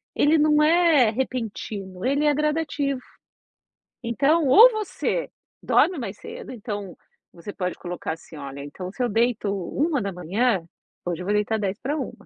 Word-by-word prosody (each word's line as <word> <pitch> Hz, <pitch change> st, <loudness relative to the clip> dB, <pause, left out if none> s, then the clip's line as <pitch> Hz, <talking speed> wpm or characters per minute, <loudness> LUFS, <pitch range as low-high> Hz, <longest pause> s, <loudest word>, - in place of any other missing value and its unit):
ele 305 Hz, +2 st, +4 dB
não 300 Hz, 0 st, +4 dB
é 320 Hz, -6 st, +5 dB
repentino, 215 Hz, -6 st, -4 dB
ele 280 Hz, +3 st, +1 dB
é 295 Hz, -, +4 dB
gradativo. 295 Hz, -2 st, -1 dB, 1.0 s
Então 280 Hz, +7 st, +2 dB
ou 445 Hz, -, +9 dB
você 430 Hz, +3 st, -2 dB, 0.3 s
dorme 365 Hz, -, +3 dB
mais 210 Hz, -6 st, -5 dB
cedo, 475 Hz, +1 st, -9 dB
então 205 Hz, -5 st, -6 dB, 0.4 s
você 170 Hz, +4 st, -8 dB
pode 180 Hz, -1 st, -3 dB
colocar 175 Hz, -2 st, -5 dB
assim: 160 Hz, -1 st, -12 dB
"Olha, 140 Hz, -1 st, -7 dB
então 180 Hz, +6 st, -7 dB
se 255 Hz, -, -2 dB
eu 245 Hz, -, +1 dB
deito 225 Hz, -1 st, +1 dB
1h, 200 Hz, -, -1 dB, 0.4 s
hoje 175 Hz, -1 st, -3 dB
eu -, -, -6 dB
vou 205 Hz, -, 0 dB
deitar 215 Hz, +1 st, 0 dB
00h50. 245 Hz, +9 st, -4 dB
240 Hz, 140 wpm, -24 LUFS, 195-300 Hz, 1.0 s, ou